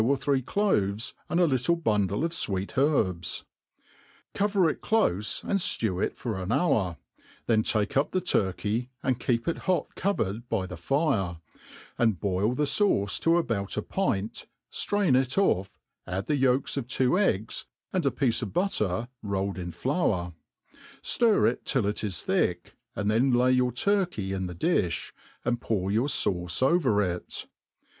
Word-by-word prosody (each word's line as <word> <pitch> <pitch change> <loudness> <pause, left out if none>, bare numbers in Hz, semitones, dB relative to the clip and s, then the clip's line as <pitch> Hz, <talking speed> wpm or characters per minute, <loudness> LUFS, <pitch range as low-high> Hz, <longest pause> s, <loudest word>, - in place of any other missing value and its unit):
or 135 +4 +2
three 135 -1 +1
cloves^ 125 - 0 0.2
and 170 - +1
a 180 - +5
little 135 +2 +2
bundle 105 - 0
of 165 - -2
fwett 100 - -2
herbs; 110 - +1 0.9
cover 200 -3 +2
it 155 - -2
clofe, 105 - +1
and 195 - 0
ftew 110 - 0
it - - -2
for 110 -6 -3
an 95 +3 -3
hour, 100 - +1 0.5
then 110 -2 +3
take 105 -1 0
up 140 +2 +2
the 185 - 0
turkey, 110 - 0
and 130 -2 0
keep 115 -2 0
it 170 - -1
hot 180 -5 +1
covered 120 - -2
by 105 -5 0
the 90 - -7
fire, 100 - 0 0.6
and 110 -7 +2
boil 100 +6 0
the 150 - 0
fauce 140 - +2
to 165 +1 +3
about 105 - -1
a 105 - -1
pint, 110 - -2 0.2
ftrain 200 -10 +2
it 130 +3 +1
off, 100 - +2 0.4
add 95 +2 -3
the 150 - +1
yolks 135 0 +1
of 130 -3 -3
two 130 +6 +2
eggs, 110 - 0 0.3
and 185 -2 +1
a 140 - +3
piece 130 -4 0
of 110 - -4
butter 115 - 0
rolled 100 -2 -2
in 85 -1 -5
^flour 95 - -1 0.7
J - - -6
ftir 230 -3 +5
it 120 - -1
till 130 -6 0
it 105 +2 -1
is 100 -4 -2
thick, - - 0 0.2
and 105 0 0
then 125 +5 +3
lay 125 +1 +4
your 125 -1 +2
turkey 175 - 0
in 95 -1 -2
the 90 - -7
di(b, 90 - 0 0.3
and 120 0 0
pour 100 -3 -1
your 115 +6 +2
fauce 90 -6 +1
over 130 - +3
it. 90 -2 -4
120 Hz, 165 wpm, -27 LUFS, 100-150 Hz, 0.9 s, a